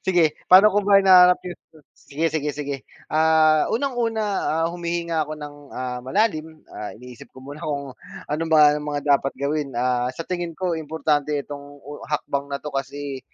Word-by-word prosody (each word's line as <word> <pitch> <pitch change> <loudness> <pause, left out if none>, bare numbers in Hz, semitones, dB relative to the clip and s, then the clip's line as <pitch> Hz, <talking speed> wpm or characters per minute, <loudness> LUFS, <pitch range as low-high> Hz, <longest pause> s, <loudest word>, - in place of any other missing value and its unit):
sige 175 -3 +4 0.2
paano 190 +3 +8
ko 205 - +3
ba 200 0 +4
hinahanap 180 -2 +7
'yung 180 - -8 0.3
sige, 150 +3 -6
sige, 150 -2 -1
sige. 145 -1 -3 0.3
Ah, 155 -1 +3
unang-una, 230 -4 -1 0.4
ah, - - +2
humihinga 170 -3 -2
ako 155 - -5
ng, 145 -1 -8 0.2
ah, 125 -1 -4
malalim, 160 - -1
ah, 105 - -6
iniisip 125 0 -13
ko 130 - -12
muna 145 +3 -9
kung 140 -4 -4 0.4
ano 155 +2 -1
ba 150 -2 +6
ang 150 - -2
mga 145 0 -2
dapat 135 0 +1
gawin, 140 -2 -2
ah, 125 0 0
sa 145 +6 -6
tingin 175 -3 -4
ko 180 0 -1
importante 150 -2 -1
itong 145 0 -8 0.2
hakbang 140 -1 -2
na 140 - -3
'to 150 +1 -8
kasi 140 0 -5
150 Hz, 170 wpm, -23 LUFS, 140-170 Hz, 0.4 s, paano